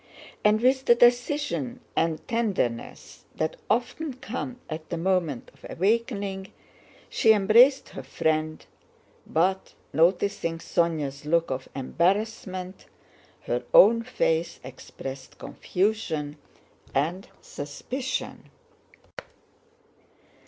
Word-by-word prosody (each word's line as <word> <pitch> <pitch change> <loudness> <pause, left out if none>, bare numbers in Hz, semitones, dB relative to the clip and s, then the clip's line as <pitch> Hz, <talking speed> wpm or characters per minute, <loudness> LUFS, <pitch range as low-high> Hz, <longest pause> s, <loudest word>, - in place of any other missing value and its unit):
And 210 +1 +4
with 260 +2 +3
the 240 - +6
decision 245 +1 +2 0.2
and 160 -1 0
tenderness 200 - -2
that 155 - -2
often 245 +6 -1
come 255 0 -6
at 155 0 -7
the 170 - -3
moment 170 -7 -1
of - - -25
awakening, 200 -1 -1 0.6
she 220 - +4
embraced 230 +7 +5
her - - -7
friend, 155 +3 -1 0.6
but 185 +4 0 0.2
noticing 170 +1 +2
Sónya's 155 -5 -1
look 165 -1 +2
of 130 0 -4
embarrassment, 185 - -1 0.5
her - - -2
own 235 - +8
face 170 -8 -1
expressed 130 +1 -9
confusion 170 -7 -2 0.6
and 165 +8 0
suspicion. 250 - -5
190 Hz, 90 wpm, -26 LUFS, 155-230 Hz, 0.6 s, own